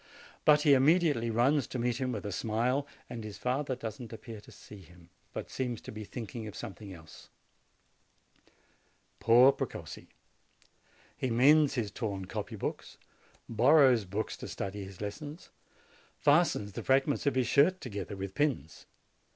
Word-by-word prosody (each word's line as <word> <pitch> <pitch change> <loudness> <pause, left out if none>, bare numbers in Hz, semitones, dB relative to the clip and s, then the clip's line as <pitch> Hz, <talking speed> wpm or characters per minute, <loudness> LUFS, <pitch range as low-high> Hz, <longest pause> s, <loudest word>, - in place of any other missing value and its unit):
But 150 -1 +6
he 145 - +6
immediately 145 -3 +3
runs 125 +4 +2
to - - -5
meet 120 -1 0
him, 130 -1 0
with 105 -4 -5
a 100 - -3
smile; 120 +8 0 0.2
and 115 -2 -7
his 105 -3 -8
father 130 +4 -1
does 115 -3 -6
not 120 -3 -9
appear 115 -1 -9
to - - -16
see 105 - -13
him, 85 0 -18 0.2
but - - -7
seems 125 -4 -3
to - - -9
be 110 0 -7
thinking 115 0 -7
of 105 - -9
something 100 -2 -8
else. 80 -3 -13 1.9
Poor 120 +4 +7
Precossi! - - -6 1.1
He 130 - -2
mends 140 +5 +5
his 110 -5 -2
torn 100 -3 -4
copy 105 +3 -5
books, 100 - -5 0.5
borrows 125 -1 +5
books 100 +4 -3
to - - -7
study 100 +1 -5
his 95 -1 -11
lessons, 145 - -7 0.7
fastens 145 -9 +2
the - - -6
frag 135 +1 +3
ments 145 0 -2
of 140 - +2
his 130 -1 +2
shirt 150 +9 +4
together 100 - -6
with 95 0 -5
pins. 140 - -2
120 Hz, 160 wpm, -30 LUFS, 105-135 Hz, 1.9 s, Poor